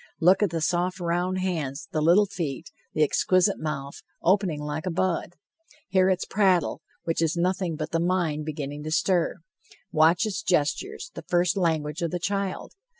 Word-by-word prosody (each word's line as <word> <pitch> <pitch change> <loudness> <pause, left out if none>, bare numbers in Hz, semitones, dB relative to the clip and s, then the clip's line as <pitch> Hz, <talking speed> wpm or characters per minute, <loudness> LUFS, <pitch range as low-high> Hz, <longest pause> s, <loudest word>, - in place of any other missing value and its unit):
Look 185 +4 +5
at 205 - +3
the 165 0 -3
soft 180 +2 0
round 175 +2 0
hands, 155 -7 -3
the 155 - 0
little 175 +7 +5
feet, 165 -6 -5 0.2
the 155 - +4
exquisite 185 +6 +2
mouth, 140 -3 -5 0.2
opening 185 -4 +2
like 150 +3 -4
a - - +2
bud! 175 0 -1 0.5
Hear 185 0 +4
its 185 -1 0
prattle, 190 -6 +2 0.2
which 165 0 -1
is 165 +1 +1
nothing 180 -1 0
but 155 +1 -5
the 165 - +1
mind 170 -4 0
beginning 145 -1 -5
to 155 - -4
stir! 175 +1 +1 0.5
Watch 160 +6 +4
its 210 -3 -2
gestures, 380 - -1
the - - -7
first 175 +1 +2
language 160 -4 0
of 170 - 0
the 180 - -2
child! 195 +1 -3
175 Hz, 170 wpm, -26 LUFS, 155-185 Hz, 0.5 s, Look